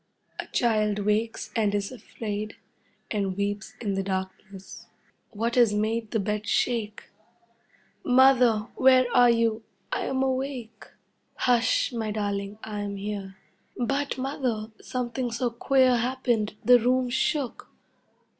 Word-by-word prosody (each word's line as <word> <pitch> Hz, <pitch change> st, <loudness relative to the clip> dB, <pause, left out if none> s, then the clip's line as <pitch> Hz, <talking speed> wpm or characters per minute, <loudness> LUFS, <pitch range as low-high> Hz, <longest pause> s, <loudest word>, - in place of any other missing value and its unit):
A -, -, -4 dB
child 215 Hz, -3 st, +1 dB
wakes 210 Hz, +1 st, -1 dB
and 210 Hz, -2 st, +1 dB
is 200 Hz, +1 st, -2 dB
afraid, 215 Hz, -4 st, -6 dB, 0.6 s
and 195 Hz, -3 st, -1 dB
weeps 200 Hz, 0 st, -3 dB
in 205 Hz, -4 st, -2 dB
the 195 Hz, -, 0 dB
darkness. 190 Hz, 0 st, -6 dB, 0.4 s
What 230 Hz, +2 st, -2 dB
has 235 Hz, -4 st, +4 dB
made 220 Hz, +1 st, -1 dB
the 220 Hz, -, 0 dB
bed 210 Hz, +1 st, -2 dB
shake? 225 Hz, -3 st, 0 dB, 1.0 s
"Mother, 250 Hz, -4 st, +5 dB
where 255 Hz, -1 st, +5 dB
are 245 Hz, -1 st, +7 dB
you? 230 Hz, -1 st, +2 dB, 0.3 s
I -, -, -1 dB
am 265 Hz, 0 st, 0 dB
awake." 260 Hz, -4 st, -3 dB, 0.5 s
"Hush, 245 Hz, 0 st, +2 dB
my 225 Hz, -2 st, -2 dB
Darling, 205 Hz, -1 st, -3 dB
I 210 Hz, -1 st, -5 dB
am 205 Hz, 0 st, -4 dB
here." 195 Hz, -1 st, -5 dB, 0.4 s
"But, 275 Hz, +4 st, -1 dB
Mother, 255 Hz, -5 st, -2 dB
something 250 Hz, 0 st, -3 dB
so 235 Hz, +1 st, -1 dB
queer 255 Hz, +1 st, +3 dB
happened, 240 Hz, -3 st, -1 dB
the 245 Hz, 0 st, +7 dB
room 250 Hz, +1 st, +1 dB
shook." 260 Hz, 0 st, -1 dB
225 Hz, 125 wpm, -26 LUFS, 210-250 Hz, 1.0 s, are